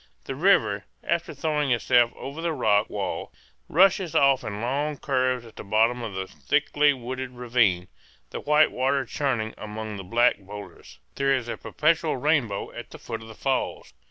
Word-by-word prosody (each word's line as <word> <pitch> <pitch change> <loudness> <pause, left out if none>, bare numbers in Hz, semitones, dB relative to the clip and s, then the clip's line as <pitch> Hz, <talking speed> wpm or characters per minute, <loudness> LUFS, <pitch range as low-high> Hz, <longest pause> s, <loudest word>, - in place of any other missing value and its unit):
The - - -5
river, 135 - +2 0.2
after 170 0 -1
throwing 150 -3 -1
itself 120 0 +3
over 140 +4 -7
the 170 -1 -1
rock 105 -8 +2
wall, - - -4 0.4
rushes 185 0 +3
off 135 -2 +4
in 105 -3 -5
long 140 +5 -1
curves 130 -3 0
at 115 - -15
the - - -7
bottom 115 +4 +2
of 105 -5 -5
a 95 - -2
thickly 95 - +1
wooded 130 0 -5
ravine, 120 -8 +1 0.4
the - - -4
white 150 +1 +4
water 135 +1 0
churning 120 -4 -1
among 110 0 -6
the 95 - -7
black 120 +6 +3
boulders. 100 +1 -11 0.2
There 135 0 +2
is 125 -3 -3
a - - -3
perpetual 155 -1 0
rainbow 130 -8 0
at - - -9
the - - -10
foot 115 -2 -6
of 110 - -11
the 110 - -11
falls. 135 +3 -2
125 Hz, 175 wpm, -25 LUFS, 110-145 Hz, 0.4 s, off